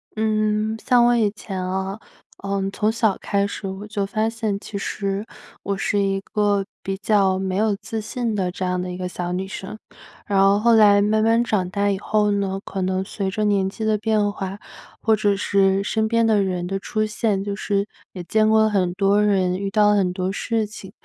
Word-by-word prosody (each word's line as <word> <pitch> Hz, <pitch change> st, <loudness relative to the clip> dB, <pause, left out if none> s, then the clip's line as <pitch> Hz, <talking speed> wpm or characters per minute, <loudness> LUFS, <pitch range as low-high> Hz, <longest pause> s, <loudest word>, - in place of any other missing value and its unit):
嗯， 215 Hz, 0 st, 0 dB
像 245 Hz, -1 st, +5 dB
我 240 Hz, 0 st, +4 dB
以 220 Hz, -3 st, +3 dB
前 190 Hz, -3 st, -5 dB
啊， 190 Hz, +2 st, -3 dB, 0.4 s
呃， 200 Hz, 0 st, -2 dB
从 215 Hz, +2 st, +1 dB
小 220 Hz, -3 st, +1 dB
开 200 Hz, -1 st, 0 dB
始 200 Hz, 0 st, -5 dB
我 190 Hz, +2 st, -6 dB
就 210 Hz, -1 st, -2 dB
发 215 Hz, +2 st, 0 dB
现 220 Hz, -3 st, -2 dB
其 210 Hz, -, -10 dB
实 195 Hz, 0 st, -3 dB, 0.4 s
我 200 Hz, -1 st, -2 dB
是 205 Hz, +1 st, 0 dB
一 195 Hz, -1 st, +1 dB
个 205 Hz, -1 st, 0 dB, 0.2 s
比 195 Hz, 0 st, -3 dB
较 195 Hz, -2 st, +2 dB
没 190 Hz, -1 st, -2 dB
有 210 Hz, +1 st, +2 dB
自 220 Hz, +2 st, -5 dB
信 230 Hz, 0 st, -3 dB
的 185 Hz, -3 st, 0 dB
这 185 Hz, -, -4 dB
样 180 Hz, 0 st, -1 dB
的 180 Hz, 0 st, -4 dB
一 180 Hz, -, -6 dB
个 180 Hz, 0 st, -3 dB
小 175 Hz, -1 st, -4 dB
女 185 Hz, +2 st, -2 dB
生。 205 Hz, 0 st, -7 dB, 0.5 s
然 195 Hz, -2 st, +2 dB
后 195 Hz, +1 st, +4 dB
后 235 Hz, +2 st, +4 dB
来 210 Hz, -2 st, +6 dB
慢 215 Hz, +1 st, +2 dB
慢 230 Hz, +1 st, +3 dB
长 190 Hz, -6 st, 0 dB
大 200 Hz, +1 st, 0 dB
以 195 Hz, -, -2 dB
后 210 Hz, 0 st, +1 dB
呢， 195 Hz, -1 st, -1 dB
可 195 Hz, -, -4 dB
能 185 Hz, 0 st, 0 dB
随 195 Hz, 0 st, -3 dB
着 215 Hz, +2 st, -2 dB
年 195 Hz, -2 st, +2 dB
纪 220 Hz, +2 st, -5 dB
的 215 Hz, -1 st, +2 dB
变 215 Hz, -1 st, +1 dB
化， 195 Hz, 0 st, -5 dB, 0.4 s
或 220 Hz, -, +3 dB
者 205 Hz, -1 st, +1 dB
是 195 Hz, 0 st, +2 dB
身 220 Hz, +1 st, 0 dB
边 230 Hz, +1 st, +2 dB
的 215 Hz, -2 st, +3 dB
人 180 Hz, -2 st, -2 dB
的 195 Hz, +2 st, -3 dB
出 215 Hz, +2 st, -1 dB
现， 210 Hz, -2 st, -1 dB
就 200 Hz, 0 st, -3 dB
是 200 Hz, 0 st, -1 dB, 0.2 s
也 180 Hz, -, -7 dB
见 215 Hz, +4 st, +2 dB
过 220 Hz, 0 st, +5 dB
了 220 Hz, -, +3 dB
很 190 Hz, -4 st, +1 dB
多 200 Hz, +1 st, +3 dB
人， 190 Hz, -3 st, +1 dB
遇 200 Hz, 0 st, -2 dB
到 210 Hz, +1 st, +4 dB
了 -, -, +3 dB
很 190 Hz, -3 st, +2 dB
多 185 Hz, +1 st, -2 dB
事 225 Hz, +2 st, -1 dB
情 205 Hz, -2 st, -11 dB
200 Hz, 235 characters per minute, -22 LUFS, 195-215 Hz, 0.5 s, 来